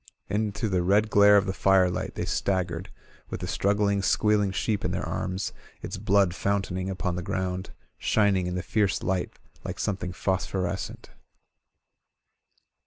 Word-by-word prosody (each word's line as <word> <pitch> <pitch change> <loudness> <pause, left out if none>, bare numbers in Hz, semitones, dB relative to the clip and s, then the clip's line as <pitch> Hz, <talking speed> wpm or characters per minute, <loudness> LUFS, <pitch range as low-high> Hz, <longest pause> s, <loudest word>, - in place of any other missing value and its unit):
Into 105 +1 -1
the 95 -3 +1
red 100 +4 +2
glare 105 0 +7
of 100 - +3
the 95 - -2
firelight 95 -2 +2
they - - -2
staggered, 95 -1 -1 0.4
with - - -4
the - - -3
struggling, 100 0 +1
squealing 105 +1 +2
sheep 100 +1 -1
in - - 0
their - - -2
arms, 95 +1 -3 0.3
its 95 - -5
blood 100 -2 +3
f 90 - -10
ountaining 95 -2 0
upon 90 -1 -2
the - - -2
ground, 95 +1 -3 0.3
shining 100 -4 +2
in 90 - -3
the 90 - -2
fierce 100 -3 0
light 90 0 -1 0.3
like - - -5
something 95 -2 -2
phosphorescent. 95 0 -2
95 Hz, 150 wpm, -27 LUFS, 90-100 Hz, 0.4 s, glare